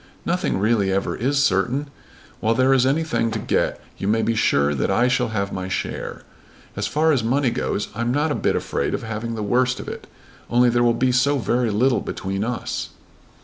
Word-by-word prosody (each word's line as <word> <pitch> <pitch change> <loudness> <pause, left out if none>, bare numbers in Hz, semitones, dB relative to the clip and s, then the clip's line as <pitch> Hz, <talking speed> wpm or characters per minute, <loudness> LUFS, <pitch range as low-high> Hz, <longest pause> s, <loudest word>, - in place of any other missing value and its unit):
"Nothing 180 - 0
really 100 -1 +2
ever 100 +1 -1
is 140 +3 +1
certain. 130 +7 0 0.5
While 115 +1 +1
there 130 +2 +4
is 130 -1 +3
anything 155 -4 +1
to 110 - -2
get - - 0 0.2
you 95 - -2
may 110 +2 +2
be 115 - +1
sure 75 -10 +2
that 70 - -1
I 115 +6 +3
shall 125 -1 +1
have 100 -3 -2
my 95 0 -4
share. 95 - -4 0.5
As - - -2
far 160 +2 +2
as 130 -6 +1
money 130 +2 +1
goes 105 - -2
I'm 120 +3 -1
not 150 +4 +1
a - - -3
bit - - +2
afraid - - -1
of - - -5
having 110 +1 -4
the 110 - -3
worst 125 +4 +1
of - - -8
it, - - -7 0.4
only 120 +1 +4
there 120 0 +2
will 120 -1 +3
be 130 +1 +2
so 140 +3 +3
very 120 -1 0
little 120 +5 +2
between 95 +1 -3
us." 120 +1 -3
120 Hz, 205 wpm, -22 LUFS, 105-130 Hz, 0.5 s, there